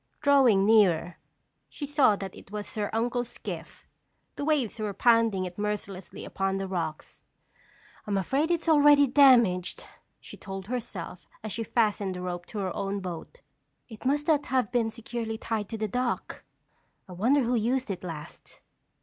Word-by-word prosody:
Drawing 265 -9 +5
nearer, 185 -6 +3 0.5
she 290 - -6
saw 280 -7 +4
that 195 -2 -7
it - - -14
was 210 0 -6
her 210 -2 -2
uncle's 240 +2 -1
skiff. - - -8 0.5
The - - -4
waves 285 -7 0
were 210 -2 -3
pounding 230 -5 +3
it 180 +2 -8
mercilessly 205 -3 -4
upon 195 0 -2
the 195 0 -3
rocks. 165 -5 -5 0.9
"I'm 200 -1 0
afraid 275 - 0
it's 340 -1 -1
already 290 -2 +6
damaged," 245 -10 +4 0.3
she - - -12
told 195 -1 -7
herself 210 -6 -6 0.2
as 215 - -5
she 225 - -3
fastened 210 -4 0
the 180 - -6
rope 175 -1 -5
to 220 - -8
her 190 -3 -2
own 200 0 -2
boat. 185 - -8 0.5
"It 220 -2 -11
must 290 +3 0
not 300 -3 +2
have 255 -4 0
been 235 -3 +1
securely 225 0 -5
tied 220 -2 -3
to 225 - -4
the 215 0 -2
dock. 250 +3 -3 0.6
I - - -12
wonder 245 +10 +2
who 240 +1 0
used 245 +1 0
it 185 - -6
last?" 160 -4 -9
220 Hz, 165 wpm, -27 LUFS, 195-250 Hz, 0.9 s, already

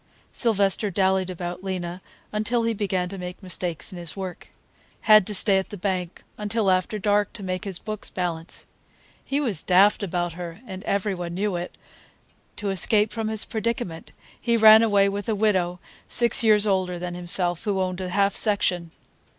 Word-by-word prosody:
Sylvester 205 -3 +1
dallied 190 0 +1
about 180 0 -6
Lena 180 -2 -4 0.3
until 230 +3 0
he 230 0 0
began 190 -4 -1
to 195 0 -7
make 180 +2 -8
mistakes 180 -2 -3
in 180 - -8
his 170 -3 -5
work; 185 -3 -7 0.5
had 215 -3 +6
to 210 - +1
stay 195 0 +4
at 190 - -6
the 205 - -8
bank 180 -2 -3 0.2
until 210 -1 +1
after 185 +3 0
dark 205 0 +1
to 205 - -8
make 185 0 -4
his 195 -3 -4
books 215 +1 -6
balance. 170 -3 -4 0.6
He 275 - -1
was 220 - -1
daft 195 +4 +4
about 175 -3 -2
her, 170 +1 -8
and 190 -3 -8
every 200 0 0
one 175 -2 -5
knew 200 0 -1
it. 175 +1 -6 0.8
To 205 -2 -3
escape 210 +3 +2
from 225 -2 -3
his 220 -1 0
predicament 225 -7 -4 0.3
he 235 -1 +1
ran 220 0 +8
away 205 -3 +3
with 200 +1 -3
a 220 - +1
widow 185 -4 +1 0.3
six 235 0 +3
years 215 -2 +5
older 185 -3 0
than 175 0 -5
himself, 175 0 +3
who 200 -2 0
owned 185 0 -2
a 185 - -4
half 200 +2 +1
section. 180 -5 +1
195 Hz, 180 wpm, -24 LUFS, 180-210 Hz, 0.8 s, ran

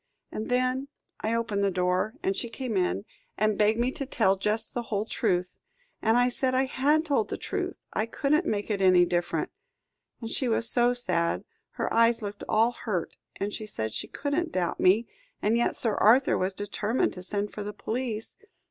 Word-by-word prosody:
And 215 - -4
then 255 +2 +1 0.3
I 220 +2 0
opened 215 -3 0
the 200 - +3
door, 185 +4 0
and 385 +1 +1
she 235 - -3
came 245 -2 -4
in, 185 +2 0 0.3
and 215 0 +2
begged 215 +2 +3
me 245 +2 +1
to 275 0 -5
tell 205 -7 +3
just 210 +3 0
the 240 - -1
whole 210 0 0
truth. 180 -4 -1 0.4
And 225 +2 +3
I 245 0 +4
said 255 +1 0
I 260 +1 +3
had 290 +4 +2
told 275 -8 +1
the - - -3
truth - - -3 0.2
I 215 - 0
couldn't 300 +8 +1
make 205 +1 -1
it 200 -2 -1
any 185 -2 +6
different. 175 0 -1 0.7
And 230 -2 -6
she 260 - 0
was 230 0 +1
so 245 +1 +3
sad 180 -9 0 0.3
her - - -2
eyes 230 0 +4
looked 205 0 -5
all 225 +2 +4
hurt, 205 -8 -3 0.2
and 205 +1 -3
she 215 - -5
said 110 - -4
she - - -3
couldn't 320 +4 -2
doubt 175 -2 -1
me, 210 +6 +4 0.3
and 215 +2 +2
yet 235 - +1
Sir 225 -3 +1
Arthur 245 +7 +5
was 190 +1 -1
determined 205 +4 -1
to 180 - -8
send 205 +2 -2
for 210 - -5
the 205 0 -4
police. 225 +1 -4
220 Hz, 195 wpm, -28 LUFS, 200-245 Hz, 0.7 s, any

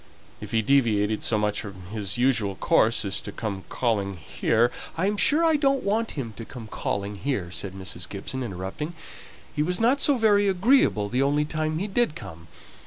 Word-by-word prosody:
If - - -8
he 110 -1 +1
deviated 110 -5 +2
so 110 - +2
much 105 0 0
from 100 -4 -9
his 105 -1 -2
usual 115 -6 +2
course 110 +4 +2
as 100 0 -1
to 100 - -7
come 100 -4 -5
calling 100 -6 -1
here 115 +9 +1
" - - -13
"I 175 - +1
am 205 +1 +1
sure 300 +10 +4
I 320 -2 +4
don't 275 -2 +2
want 220 +3 0
him 115 -5 -4
to - - -6
come 115 0 -9
calling 100 -1 -3
here," 100 -8 -2
said 90 +3 -5
Mrs. 95 -2 -6
Gibson, 105 +6 -5
interrupting. 110 - -5 0.6
"He 150 - +1
was 180 +4 0
not 250 +5 +3
so 285 -3 +3
very 205 -3 +4
agreeable 195 - +3
the 125 +5 0
only 145 +2 +2
time 155 0 -2
he 185 - -1
did 210 -5 0
come. 85 - -10
120 Hz, 195 wpm, -25 LUFS, -, 0.6 s, sure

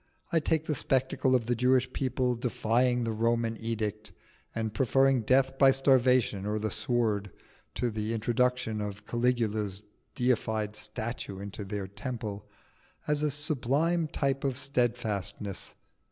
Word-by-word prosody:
I 165 - +4
take 160 0 0
the 155 - 0
spectacle 130 -1 +1
of 120 -3 +1
the 120 - +1
Jewish 125 +2 +2
people 130 -1 0
defying 120 +1 +1
the 115 - -1
Roman 115 +1 +1
edict, 110 -2 -3 0.4
and 110 -1 -2
preferring 135 +2 +3
death 135 +3 +2
by 135 - +8
starvation 130 -6 +3
or 105 +1 -1
the 110 0 -2
sword 110 -5 0 0.5
to 120 -1 0
the 110 0 -2
introduction 120 -1 0
of 105 0 -5
Caligula's 110 -5 0 0.3
deified 110 -4 0
statue 105 -1 -4
into 100 +1 -6
the 100 -1 -4
temple, 105 -1 -6 0.6
as 150 -1 +1
a 150 - +2
sublime 150 +3 0
type 135 -1 -1
of 135 -3 -1
steadfastness. 110 -7 -1
120 Hz, 135 wpm, -29 LUFS, 105-130 Hz, 0.6 s, by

